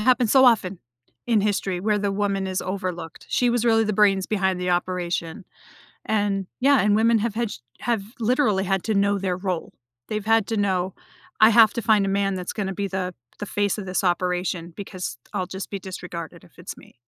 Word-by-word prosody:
happens 245 0 +3
so 265 -1 +7
often, 195 -7 +3 0.5
in 225 -3 +3
history, 195 -3 -1
where 210 +1 +1
the 200 -1 -1
woman 195 -1 -1
is 185 0 -2
overlooked. 185 -4 -5
She 245 - +2
was 240 0 +1
really 225 -1 +4
the 215 - -1
brains 195 -2 +3
behind 190 -3 0
the 180 0 -1
operation, 175 0 -2 0.6
and, 205 -3 0
yeah, 275 0 +4
and 205 0 +3
women 230 +1 +4
have 225 -1 -1
had 230 -1 -1
ch - - -8 0.2
have, 230 -5 -1 0.2
literally, 220 -5 +2
had 195 -1 0
to 220 - 0
know 200 0 +2
their 185 -2 -2
role. 185 -3 -3 0.4
They've 215 -1 -3
had 225 -2 +3
to 225 - -2
know, 190 -2 0 0.5
"I 220 - +9
have 225 -1 +6
to 235 - -2
find 210 -2 +3
a - - -1
man 195 0 0
that's 180 -1 -4
gonna 195 -3 -3
be 200 +1 -2
the 185 -1 -3 0.3
the 205 - -4
face 205 +1 -1
of 200 - -5
this 185 +1 -1
operation, 180 -1 -1
because 185 - -6 0.2
I'll 185 - -1
just 190 0 -6
be 200 - -4
disregarded 180 -3 -8
if - - -20
it's - - -8
me." - - -17
200 Hz, 205 wpm, -24 LUFS, 185-215 Hz, 0.6 s, I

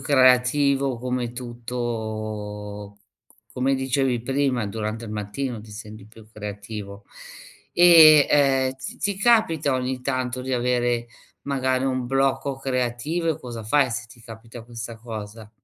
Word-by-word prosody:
creativo, 135 0 +3
come 125 -1 -3
tutto 110 -4 -5
c - - -33
c - - -29
come 130 +2 +1
dicevi 130 -2 0
prima, 135 -3 0
durante 110 +2 -4
il 105 - -7
mattino 110 +3 -4
ti 110 - -14
senti 105 -1 -10
più 110 0 -16
creativo. 105 -1 -7 0.7
E, 160 -4 +8
ehm, 135 -2 +3
ti 130 - -8
ti 200 -1 -1
capita 195 - +3
ogni 130 0 -2
tanto 130 -1 -2
di 130 0 -4
avere, 120 -1 0 0.4
magari, 130 -2 0
un 130 -2 -1
blocco 135 +1 0
creativo, 135 +5 -1
e - - -4
cosa 120 -3 -7
fai 130 +4 +3
se 115 0 -4
ti 120 +1 -17
capita 115 +1 -11
questa 115 0 -8
cosa? 110 -1 -8
125 Hz, 140 wpm, -24 LUFS, 110-135 Hz, 0.7 s, E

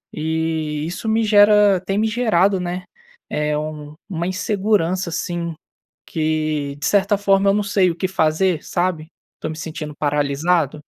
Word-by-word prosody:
eh, - - -6
isso 160 +3 -2
me 225 +1 +2
gera 205 -2 +5
tem 195 +1 -1
me 220 +1 +2
gerado, 210 -4 +2
né, 180 +1 -4 0.5
eh, 150 0 -1
um 150 -1 -6
uma 170 -2 -2
insegurança 185 -2 0
assim, 170 0 -3 0.5
que, 155 -3 -1
de 145 - -3
certa 200 +3 +2
forma, 195 0 +3
eu - - +4
não 210 - +1
sei 195 -2 +2
o - - -6
que 185 - -1
fazer, 165 -1 +1
sabe, 175 -3 -2 0.3
estou - - -5
me 155 - -6
sentindo 160 -1 -6
paralisado. 150 +1 0
170 Hz, 155 wpm, -20 LUFS, 155-195 Hz, 0.5 s, gera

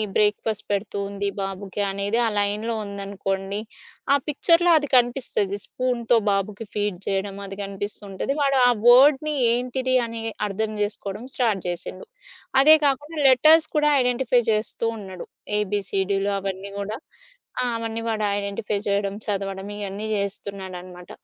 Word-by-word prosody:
Breakfast 210 0 +1
పెడుతూ 200 0 -2
ఉంది 200 0 -3
బాబుకి 195 +1 -4
అనేది 200 +3 -1
ఆ - - +2
లైన్‌లో 210 +3 0
ఉందనుకోండి. 195 0 -4 0.5
ఆ - - +7
పిక్చర్‌లో 335 +4 +3
అది 290 -1 -1
కనిపిస్తది. 240 -5 +1
స్పూన్‌తో 245 -2 0
బాబుకి 200 +2 -2
ఫీడ్ 205 -3 -1
చేయడం. 195 0 -1
అది 195 0 -8
కనిపిస్తూ 200 +1 -5
ఉంటది. 195 +8 -2
వాడు 275 -1 +2
ఆ - - +6 0.2
వర్డ్‌ని 285 +4 +6 0.2
ఏంటిది 255 +2 0
అని 230 0 -6 0.3
అర్థం 215 +2 -2
జేసుకోవడం 205 +1 -4
స్టార్ట్ 220 -7 +1
జేసిండు. 175 - -5 0.6
అదే 310 +3 +9
కాకుండా 290 +3 0
లెటర్స్ 310 +5 +6
కూడా 300 0 +4
ఐడెంటిఫై 250 0 +2
జేస్తూ 220 +1 -1
ఉన్నాడు. 190 -4 -9 0.3
ఏబీసీడిలు 200 -1 -1
అవన్నీ 195 0 -5
కూడా. 210 +2 -4 0.6
ఆ - - +1
అవన్నీ 230 0 -4
వాడు 215 -1 -1
ఐడెంటిఫై 200 +1 -2
చేయడం, 200 0 0
చదవడం 195 -1 -3
ఇయన్నీ 205 +1 -5
జేస్తున్నాడనమాట. 190 -3 -6
205 Hz, 130 wpm, -23 LUFS, 195-245 Hz, 0.6 s, అదే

